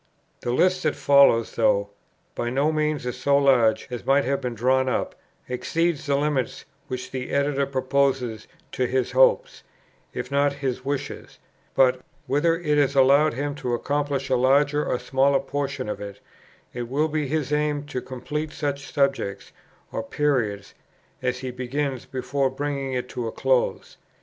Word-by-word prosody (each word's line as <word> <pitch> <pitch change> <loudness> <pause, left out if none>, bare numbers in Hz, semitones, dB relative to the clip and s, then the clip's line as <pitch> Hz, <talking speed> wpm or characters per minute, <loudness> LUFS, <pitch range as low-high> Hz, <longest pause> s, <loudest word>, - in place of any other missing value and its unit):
The 120 - -3
list 185 +8 +2
that 155 -3 0
follows, 140 -5 +4
though 100 -2 +2 0.4
by 120 - -2
no 140 +5 +1
means 150 -5 -1
so 140 0 +2
large 130 -6 +3
as 120 - -5
might 140 +1 +3
have 140 +2 0
been 125 -2 -3
drawn 130 +3 +2
up, - - -1 0.3
exceeds 160 +5 -1
the 140 - +2
limits 140 -4 -1 0.2
which 130 0 -5
the 130 -1 -4
Editor 140 -1 +1
proposes 130 -4 0 0.2
to 125 - 0
his 130 0 0
hopes, 130 +1 +3 0.5
if 125 - -6
not 140 0 +2
to - - -13
his 130 -3 -3
wishes; 140 0 -5 0.4
but, 130 -1 +4 0.2
whether 165 +4 +2
it 150 -4 +1
is 140 -1 +2
allowed 140 +2 +5
him 145 +2 -2
to 125 -4 -2
accomplish 140 +1 -1
a - - +5
larger 140 +4 +3
or - - -1
smaller 135 +2 +2
portion 140 -2 -3
of 105 - -4
it, 100 0 -8 0.5
it 120 -1 -5
will 150 +4 +1
be 155 -2 -2
his 150 0 -1
aim 150 -1 0
to 140 -3 -4
complete 150 +5 -5
such 140 -3 -4
subjects 135 -9 -1 0.4
or - - -2
periods 110 -6 -1 0.5
as 125 -1 -1
he 130 -1 -4
begins 130 +1 -3
before 130 +1 -1
bringing 140 0 -3
it 125 0 -2
to 120 -2 -4
a - - -3
close. 130 0 0
135 Hz, 165 wpm, -24 LUFS, 125-145 Hz, 0.5 s, allowed